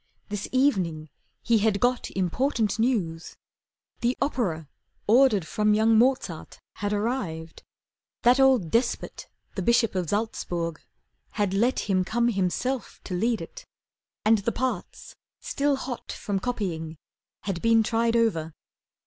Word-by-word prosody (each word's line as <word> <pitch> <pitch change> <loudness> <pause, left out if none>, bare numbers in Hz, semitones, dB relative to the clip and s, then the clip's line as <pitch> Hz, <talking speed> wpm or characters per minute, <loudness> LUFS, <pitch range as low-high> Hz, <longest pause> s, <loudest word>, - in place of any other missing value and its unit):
This 205 -1 -4
evening 180 - +1 0.3
he 230 -2 +3
had 210 -1 +2
got 245 +2 +1
Important 220 - 0
news. 190 -9 -1 0.6
The 240 +2 0
opera 195 - -1 0.4
ordered 220 -5 +4
from 210 +5 +2
Young 220 +1 +4
Mozart 225 -8 +1 0.2
was 205 0 -1
arrived. 205 -8 -3 0.6
That 245 +3 +5
old 260 -11 +4
despot, 235 +1 -1 0.3
The 195 - -3
Bishop 235 +3 +3
of 180 -4 -2
Salzburg, 175 -6 -2 0.5
had 205 -3 0
let 235 +6 +2
him 185 -2 +1
come 235 +5 +1
Himself 225 +5 -2
to 185 - -6
lead 225 +6 0
it, - - -10 0.6
and 220 0 +5
the 215 +4 -1
parts, 260 +2 -4 0.2
still 290 - 0
hot 265 -2 -6
From 200 -2 -3
copying, 175 -9 -3 0.4
had 195 -4 -3
been 230 -1 +4
tried 230 +1 +1
over. 165 -9 +1
220 Hz, 130 wpm, -26 LUFS, 185-245 Hz, 0.6 s, That